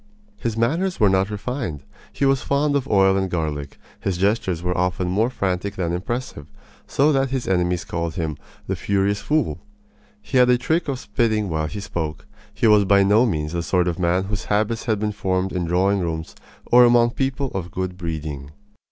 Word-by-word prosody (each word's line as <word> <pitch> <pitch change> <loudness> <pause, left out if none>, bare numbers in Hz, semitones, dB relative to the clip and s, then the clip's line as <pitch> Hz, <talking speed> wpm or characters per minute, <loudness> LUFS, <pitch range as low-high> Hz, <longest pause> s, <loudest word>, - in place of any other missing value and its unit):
His 115 - -3
manners 165 +11 0
were 105 - +5
not 95 +1 +2
refined. 105 - -4 0.3
He 140 - -1
was 135 -2 +3
fond 145 +1 +1
of 135 -2 0
oil 95 -1 +4
and 95 -1 0
garlic. 75 -5 -3 0.2
His 95 -3 -2
gestures 95 -3 0
were 90 0 -1
often 90 +1 0
more 110 +6 +1
frantic 95 -3 -2
than 85 -3 -2
impressive, 95 - -4 0.4
so 145 +3 +3
that 135 -2 +1
his 130 -2 -3
enemies 90 -2 0
called 85 -1 -3
him 80 -5 -3 0.3
"the - - -2
furious 100 +1 0
fool." 155 +1 0 0.6
He 140 - -2
had 125 0 +5
a 125 - +5
trick 160 +7 0
of 135 -2 -1
spitting 110 -3 0
while 80 -1 -1
he 105 +6 -6
spoke. 80 -7 -4 0.3
He - - -1
was 105 -2 +6
by 100 0 +4
no 105 +5 +4
means 75 -5 -2
the 85 - -1
sort 90 +1 +1
of 85 +1 -2
man 90 +1 +1
whose 100 0 -4
habits 110 +2 0
had 110 -3 +1
been 105 0 -1
formed 95 -2 -1
in 90 -2 -1
drawing 95 +4 +2
rooms 80 -2 -3 0.3
or 125 +1 +6
among 120 -1 +5
people 135 +1 -2
of 90 -2 -4
good 95 0 -4
breeding. 80 -5 -5
100 Hz, 195 wpm, -22 LUFS, 90-120 Hz, 0.6 s, was